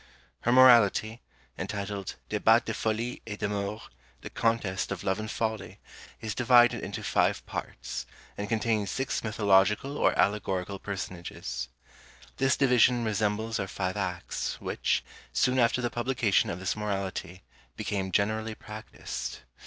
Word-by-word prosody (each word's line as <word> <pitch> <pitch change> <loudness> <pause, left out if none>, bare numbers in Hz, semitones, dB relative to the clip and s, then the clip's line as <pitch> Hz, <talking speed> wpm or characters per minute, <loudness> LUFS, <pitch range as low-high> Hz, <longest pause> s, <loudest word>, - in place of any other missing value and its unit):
Her 120 - +1
Morality, 120 -3 +6 0.4
entitled 100 -1 -4
"Débat - - +4
de - - -2
Folie 115 +2 -2
et 105 -2 -5
d'Amour 105 +1 -2 0.4
the - - -8
Contest 110 -5 0
of 100 - -4
Love 95 +2 0
and 110 0 -4
Folly," 110 -4 -3 0.4
is 110 -1 -3
divided 120 -1 +5
into - - -5
five - - +1
parts, - - -5 0.3
and 100 0 -4
contains 110 -3 0
six 135 +6 -2
mythological 105 +5 +2
or - - +3
allegorical 100 -2 0
personages. 85 -10 -5 0.7
This 135 0 +2
division 125 -2 +4
resembles 110 +1 0
our 100 - -2
five 95 -1 -3
acts, 95 -4 -3
which, - - 0 0.3
soon 125 - +2
after 120 +1 +3
the 120 - 0
publication 120 -4 +1
of 85 - -3
this 95 0 -2
Morality, 95 -3 -4 0.3
became 95 -2 -2
generally 110 +3 0
practised. 105 - -7
105 Hz, 130 wpm, -28 LUFS, 95-115 Hz, 0.7 s, Morality